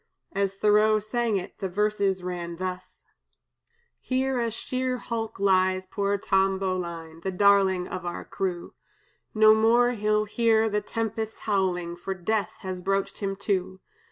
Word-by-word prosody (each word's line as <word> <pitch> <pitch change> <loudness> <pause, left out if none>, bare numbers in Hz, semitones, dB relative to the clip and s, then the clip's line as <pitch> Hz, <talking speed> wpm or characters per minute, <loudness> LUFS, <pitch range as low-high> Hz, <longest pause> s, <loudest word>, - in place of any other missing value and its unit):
As 195 -1 -1
Thoreau 210 +2 +4
sang 215 0 0
it, 180 - -7
the 190 - -2
verses 200 -1 0
ran 175 -1 -4
thus: 185 +1 -6 0.9
"Here 260 0 -1
a 235 -1 0
sheer 255 +3 -2
hulk 225 -4 -4
lies 185 -1 +2
poor 200 +1 -1
Tom 195 0 +2
Bowline, 170 -4 -4
The 190 - -2
darling 190 -1 +3
of 185 - -5
our 175 -1 -5
crew; 180 -3 -4 0.6
No 215 0 +7
more 235 +3 +4
he'll 215 -2 +1
hear 225 0 +2
the 210 0 0
tempest 225 0 -4
howling, 180 -4 -1
For 190 +2 -4
death 205 +3 -1
has 185 -2 -5
broached 195 +1 -1
him 195 -1 -2
to. 190 -2 -1
200 Hz, 145 wpm, -26 LUFS, 185-220 Hz, 0.9 s, No